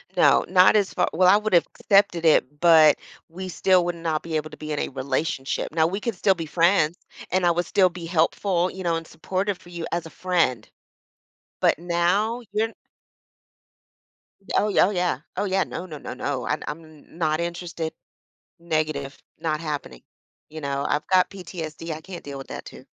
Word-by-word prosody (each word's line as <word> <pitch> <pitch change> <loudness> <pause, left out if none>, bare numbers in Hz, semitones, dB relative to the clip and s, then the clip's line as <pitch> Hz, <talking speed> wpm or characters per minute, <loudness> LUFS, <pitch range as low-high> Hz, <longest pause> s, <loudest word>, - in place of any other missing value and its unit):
No, - - +5
not 185 +3 +6
as 200 -2 0
far - - +1
well, 180 +2 +4
I 195 - +7
would've 210 -5 +3
accepted 195 -4 +2
it, 150 -2 +3
but 160 -3 +7 0.3
we 185 +2 -7
still 185 0 +3
would 175 -1 -2
not 165 -2 -2
be 165 -1 -4
able 155 0 -4
to - - -11
be 155 0 -6
in 150 - -1
a - - -1
relationship. 135 +2 -2
Now 160 -1 +3
we 195 +4 -3
could 230 -2 -3
still 190 +2 +3
be 165 -2 -5
friends, 170 0 +2 0.3
and 185 -1 +2
I 170 - +5
would 175 +1 0
still 185 -2 +3
be 175 -1 -8
helpful, 175 +2 +1
you 190 -1 -7
know, 170 -1 +1
and 165 0 -4
supportive 190 +4 -3
for 175 - -17
you 170 -2 -5
as 170 -1 -2
a - - -8
friend. 165 -13 0 0.9
But - - +3
now 180 +7 0
you're 225 +1 +1 1.9
Oh, 210 0 +2
oh, 185 - +6
yeah. 180 -8 0 0.2
Oh, 205 - -1
yeah, 190 -1 +1
no, 180 - -6
no, 155 -4 -8
no, - - -7
no. 130 0 -3
I 150 - 0
I'm 160 +2 -5
n 155 0 -17
not 155 -1 +1
interested, 170 -1 -4 0.7
negative, 155 -4 -2 0.2
not 155 -1 -2
happening, 145 - -5 0.5
you 155 0 -8
know? 140 0 -2
I've 150 - -1
got 185 -1 +4
PTSD, 165 -4 -7
I 155 +1 -5
can't 180 +1 -9
deal 140 -1 -7
with 135 - -9
that - - -7
too. - - -12
170 Hz, 190 wpm, -24 LUFS, 155-185 Hz, 1.9 s, I